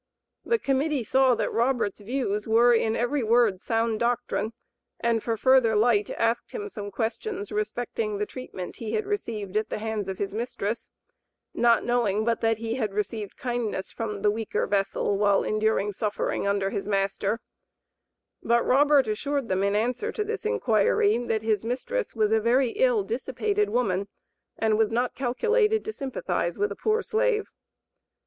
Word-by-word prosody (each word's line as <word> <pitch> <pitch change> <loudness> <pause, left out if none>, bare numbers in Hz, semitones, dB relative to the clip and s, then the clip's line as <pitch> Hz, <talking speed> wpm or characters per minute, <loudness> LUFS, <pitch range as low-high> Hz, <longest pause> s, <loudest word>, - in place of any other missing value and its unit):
The 465 - +2
Committee 280 - 0
saw 260 +2 +3
that - - -2
Robert's 235 -4 0
views 210 -2 -2
were 235 +2 +5
in 225 -1 +2
every 260 +4 0
word 225 -4 +3
sound 225 -1 0
doctrine, 235 -2 -1 0.5
and 230 -1 +1
for 225 0 -2
further 255 -3 +4
light 210 -1 +3
asked 230 +1 0
him 420 -2 -4
some 205 - -6
questions 255 - -3
respecting 240 - -2
the 210 - -1
treatment 205 -7 -8
he 220 -2 -5
had 430 - 0
received 220 - -4
at 215 0 0
the - - -3
hands 215 -2 -3
of 190 - -4
his 200 -1 -3
mistress, 230 -1 -3 0.6
not 235 -1 +3
knowing 220 -4 +1
but 230 -1 0
that 225 -1 +2
he 225 0 -3
had 215 -6 -2
received 210 0 -3
kindness 240 -6 -3
from 210 -3 -5
the 210 - +4
"weaker 220 0 -2
vessel;" 200 0 0
while 200 -1 +3
enduring 215 -1 0
suffering 205 0 -2
under 200 -1 0
his 200 - -3
master; 200 +2 0 1.0
but 235 0 +2
Robert 280 -1 +4
assured 275 +4 -2
them 190 0 +1
in 200 +1 +1
answer 250 - 0
to 425 - -2
this 430 0 -3
inquiry 225 - +2
that 225 -3 -1
his 215 -2 +1
mistress 265 - -3
was 215 -1 +2
a 220 - +4
very 240 +2 +3
"ill, - - +2
dissipated 420 -1 -1
woman," 200 -5 0 0.5
and 220 -1 +1
"was 220 -1 +3
not 245 +2 0
calculated 430 - +1
to 435 - -4
sympathize 185 - -2
with 205 0 0
a - - -4
poor 435 - 0
slave." 440 -2 0
230 Hz, 165 wpm, -26 LUFS, 210-265 Hz, 1.0 s, were